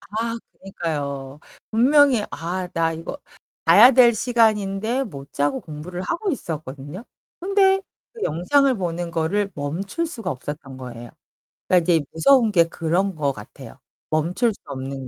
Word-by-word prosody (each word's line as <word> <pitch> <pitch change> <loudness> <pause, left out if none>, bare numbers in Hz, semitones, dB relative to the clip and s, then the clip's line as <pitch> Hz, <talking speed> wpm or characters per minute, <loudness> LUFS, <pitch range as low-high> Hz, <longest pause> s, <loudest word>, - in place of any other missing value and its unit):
아 230 +3 -3 0.2
그니까요. 145 -6 -5 0.3
분명히 260 +1 +4
아 180 +2 -4
나 165 -1 +1
이거 165 - -7 0.5
자야 250 - +9
될 240 -2 +6
시간인데 220 +1 +1
못 140 - -10
자고 140 -1 0
공부를 165 +4 -7
하고 370 - -2
있었거든요. 155 - -6 0.4
근데 385 0 +3 0.3
그 460 - -10
영상을 270 - +2
보는 175 -2 -3
거를 195 +6 0
멈출 185 - -3
수가 225 - -5
없었던 135 0 -7
거예요. 120 -2 -9 0.6
그러니까 180 -2 +4
이제 160 - +2
무서운 235 +5 +4
게 170 -4 +5
그런 170 +3 -1
것 145 -3 0
같아요, 105 -4 -12 0.3
멈출 175 +9 +1
수 - - -19
없는 135 0 -6
180 Hz, 290 characters per minute, -22 LUFS, 150-230 Hz, 0.6 s, 자야